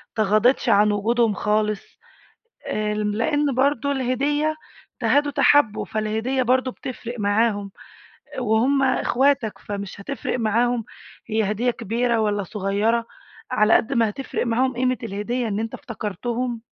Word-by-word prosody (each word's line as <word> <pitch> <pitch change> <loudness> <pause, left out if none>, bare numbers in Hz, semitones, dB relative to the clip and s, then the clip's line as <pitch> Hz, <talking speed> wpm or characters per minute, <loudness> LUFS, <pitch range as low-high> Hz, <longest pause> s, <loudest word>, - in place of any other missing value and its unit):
تغاضيتش 215 +4 +2
عن 210 +1 +5
وجودهم 225 +2 +1
خالص، 210 0 0 0.9
آآ 210 0 -1
لإن 230 +8 0
برضه 280 +1 +1
الهدية 280 +4 0 0.5
تهادوا 290 0 +2
تحابوا، 285 -5 +3
فالهدية 220 +5 -1
برضه 255 +1 +2
بتفرق 245 -2 -7
معاهم، 205 -1 +1 0.7
وهُم 250 +4 +2
إخواتك 265 -2 +1
فمش 200 -1 -6
هتفرق 255 +2 -3
معاهم 230 +1 +1 0.4
هي 215 -2 +1
هدية 240 +4 +1
كبيرة 235 +2 -1
والّا 205 -1 0
صغيرة، 210 +4 0 0.5
على 215 +1 +4
قد 230 - +2
ما 230 -4 +2
هتفرق 255 +2 -4
معاهم 255 +3 +1
قيمة 255 +1 0
الهدية 230 +3 -2
إن 205 0 -2
أنت 225 0 -4
افتكرتهم. 235 +2 -4
230 Hz, 120 wpm, -23 LUFS, 210-255 Hz, 0.9 s, عن